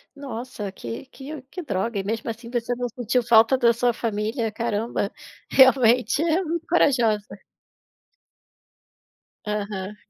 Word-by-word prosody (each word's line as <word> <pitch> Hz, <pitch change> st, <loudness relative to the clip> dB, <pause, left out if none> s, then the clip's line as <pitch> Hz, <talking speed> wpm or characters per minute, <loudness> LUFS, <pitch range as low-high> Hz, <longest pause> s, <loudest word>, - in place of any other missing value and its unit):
Nossa, 255 Hz, -6 st, -6 dB
que 115 Hz, -, -7 dB
que 275 Hz, +2 st, -9 dB
que 285 Hz, +8 st, -8 dB
droga, 215 Hz, -3 st, -2 dB
e 195 Hz, -, -1 dB
mesmo 225 Hz, +3 st, -3 dB
assim 230 Hz, +1 st, -7 dB
você 240 Hz, 0 st, -2 dB
não 245 Hz, 0 st, -2 dB
sentiu 245 Hz, 0 st, -1 dB
falta 230 Hz, +2 st, +5 dB
da 235 Hz, -2 st, +4 dB
sua 240 Hz, +1 st, +1 dB
família, 225 Hz, +1 st, -2 dB
caramba, 220 Hz, -2 st, -2 dB, 0.4 s
realmente 255 Hz, 0 st, +5 dB
é 335 Hz, +3 st, +2 dB
muito 335 Hz, 0 st, -3 dB
corajosa. 235 Hz, -10 st, +1 dB, 2.0 s
Aham. 205 Hz, -1 st, -4 dB
235 Hz, 125 wpm, -24 LUFS, 215-260 Hz, 2.0 s, falta